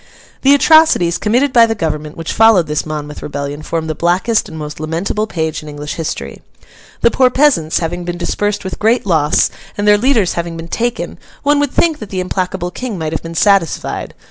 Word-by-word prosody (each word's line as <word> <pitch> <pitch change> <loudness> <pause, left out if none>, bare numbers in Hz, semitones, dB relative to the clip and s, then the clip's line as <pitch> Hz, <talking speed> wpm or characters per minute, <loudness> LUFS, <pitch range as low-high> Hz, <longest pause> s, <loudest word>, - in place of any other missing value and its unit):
The 275 +1 +6
atrocities, 285 - +4
committed 250 +6 +1
by 235 -1 +6
the 225 - -1
Government, 150 -5 -3
which 165 -1 -4
followed 225 -6 +5
this 150 0 -2
Monmouth 150 -1 -6
rebellion, 145 0 -5
form 165 +1 -3
the 160 - -2
blackest 180 +8 +1
and 160 - -9
most 150 -1 -7
lamentable 170 +7 -2
page 160 -6 -3
in 150 - -10
English 145 0 -6
history. 165 -2 -5 0.6
The 235 - +4
poor 255 -1 +4
peasants, 255 - +2
having 175 +1 -3
been 175 0 -4
dispersed 205 +3 -2
with 190 - -6
great 225 +2 +2
loss, 155 -5 +2 0.3
and 205 0 -1
their 205 0 +6
leaders 230 -6 +2
having 170 -1 -4
been 165 +1 -8
taken, 240 +4 -3 0.2
one 290 0 +3
would 290 -1 +1
think 325 -3 +1
that 215 - -8
the 190 - -3
implacable 185 0 -2
King 245 -3 -5
might 160 -2 -3
have 160 - -2
been 165 0 -8
satisfied. 195 -2 +1
180 Hz, 195 wpm, -16 LUFS, 160-225 Hz, 0.6 s, The